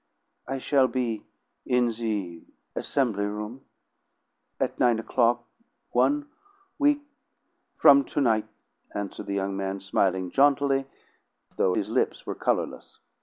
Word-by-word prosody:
"I 135 +1 -2
shall 135 0 +3
be 120 -3 -2 0.4
in 125 -1 +2
the 105 -7 -3 0.3
Assemily 115 -8 0
Room' 105 +5 -6 1.0
at - - -1
nine 120 -2 +4
o'clock, 120 +1 +1 0.5
one 295 0 +2 0.5
week 290 0 +3 0.8
from 140 -1 +7
to - - -3
night," 110 -5 +2 0.5
answered 105 -1 -5
the 100 - -2
young 95 0 -1
man, 95 0 -3
smiling 95 -1 0
jauntily, 140 -1 +3 0.7
though 90 -1 +2
his - - -2
lips - - 0
were - - -3
colorless. - - -2
115 Hz, 120 wpm, -26 LUFS, 100-135 Hz, 1.0 s, from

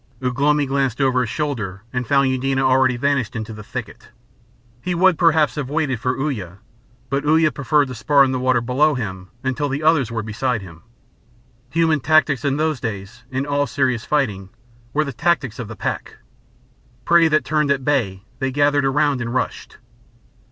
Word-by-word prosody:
Ugh 125 0 -3
lomi 150 0 +3
glanced 135 -2 -1
over 130 -2 +2
his 120 - -2
shoulder 110 -10 -3
and 125 -1 -2
found 140 0 +3
Eudena 135 +1 0
already 130 -1 +3
vanished 130 -3 0
into 110 -1 -5
the 105 - -9
thicket. 105 - -8 0.7
He 180 +4 -2
would 185 +1 +4
perhaps 160 -2 +3
have 145 -4 -4
waited 145 -5 -1
for 125 +2 -1
Uya, 105 - -3 0.5
but 140 +1 0
Uya 155 +1 +3
preferred 140 +3 +1
to - - -5
spar 125 +5 +3
in 135 - +1
the 130 - -1
water 130 -1 +2
below 140 +5 +2
him 95 -6 -5
until 135 +2 -1
the 140 +3 -3
others 155 -6 +3
were 115 -2 -3
beside 110 +1 -2
him. 85 -3 -12 0.9
Human 160 0 +2
tactics 145 -2 +2
in 140 0 0
those 155 -3 0
days, 110 +1 -6
in 130 +1 -2
all 145 0 0
serious 130 -4 0
fighting, 105 -11 -1 0.4
were 155 +3 +1
the 140 - -5
tactics 140 -5 0
of 120 - -5
the 115 - -8
pack. - - -4 0.9
Prey 170 -1 +5
that 155 -4 +1
turned 150 0 +1
at 135 -2 0
bay 105 -10 0 0.2
they 135 0 0
gathered 145 0 +2
around 140 -1 +1
and 120 +1 -4
rushed. 125 - -3
135 Hz, 180 wpm, -20 LUFS, 120-145 Hz, 0.9 s, Prey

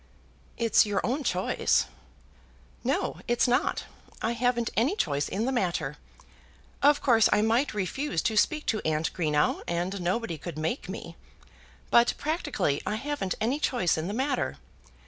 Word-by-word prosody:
"It's 230 -1 +4
your 205 -3 -1
own 270 +5 -1
choice." - - +1 1.0
"No, - - -1
it's 240 +1 +2
not. 245 - +1 0.4
I 225 - 0
haven't 235 0 0
any 255 - +2
choice 145 - 0
in 210 +4 -1
the 265 - 0
matter. 170 - -1 0.8
Of 290 +1 +4
course 230 -5 +5
I 210 - +4
might 230 +3 +1
refuse 205 - -1
to 220 - 0
speak 305 +8 +2
to 215 - 0
Aunt 155 0 0
Greenow, 150 -4 +1
and 180 +3 -2
nobody 175 -2 -1
could 170 -1 -7
make 160 - -2
me; - - -7 0.7
but 235 0 +5
practically 305 - -1
I 210 - -2
haven't 245 -6 -2
any 250 +7 0
choice 240 - +1
in 160 +2 -3
the 205 - -3
matter. 270 +4 -1
225 Hz, 150 wpm, -28 LUFS, 175-250 Hz, 1.0 s, course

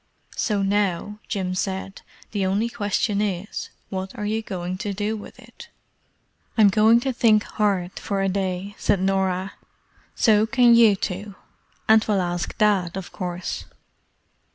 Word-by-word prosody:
"So 205 -2 0
now," 205 0 0
Jim 190 -4 -2
said, 190 +1 -3 0.3
"the 205 -2 -1
only 200 +5 +1
question 205 -1 -1
is, 200 -1 -3 0.2
what 190 0 -5
are 210 - -3
you 220 +2 -1
going 185 -3 -5
to 205 -1 -3
do 210 +2 -1
with 210 - -10
it?" - - -14 0.9
"I'm 210 -2 +7
going 220 +3 +5
to 265 0 -1
think 215 -3 +4
hard 195 -4 -1
for 195 -2 -2
a - - +1
day," 190 0 -2
said 205 -2 +2
Norah. 190 0 0 0.6
"So 215 -1 +4
can 245 -1 +5
you 230 -3 +6
two; 195 +1 -5 0.5
and 220 0 +6
we'll 205 -2 +1
ask 175 0 -3
Dad, 195 -5 +2
of 190 - -7
course." 180 -1 -5
200 Hz, 150 wpm, -23 LUFS, 190-215 Hz, 0.9 s, I'm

